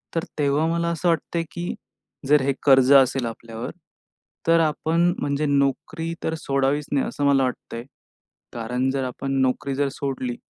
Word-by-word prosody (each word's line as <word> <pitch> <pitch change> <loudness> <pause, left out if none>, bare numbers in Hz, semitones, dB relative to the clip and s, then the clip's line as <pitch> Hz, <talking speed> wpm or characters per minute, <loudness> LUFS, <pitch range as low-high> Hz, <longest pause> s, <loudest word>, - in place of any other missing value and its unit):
तर 165 - 0 0.2
तेव्हा 145 +2 +2
मला 170 0 0
असं 170 +1 -1
वाटतंय, 165 0 0
की 175 +1 -4 0.5
जर 150 -1 +5
हे 135 +1 +1
कर्ज 135 -1 +5
असेल 135 -2 +5
आपल्यावर 115 0 -6 0.8
तर 165 0 +5
आपण 165 +2 +1
म्हणजे 145 +1 -1
नोकरी 145 +4 0
तर 160 - -1
सोडावीच 140 0 0
नाही, 140 -2 +1
असं 145 - -2
मला 135 -1 +4
वाटतंय. 120 -2 -4 0.7
कारण 125 +3 -1
जर 135 -1 -1
आपण 135 +2 -4
नोकरी 130 +1 0
जर 140 0 +1
सोडली, 130 -3 -3
140 Hz, 155 wpm, -23 LUFS, 130-160 Hz, 0.8 s, जर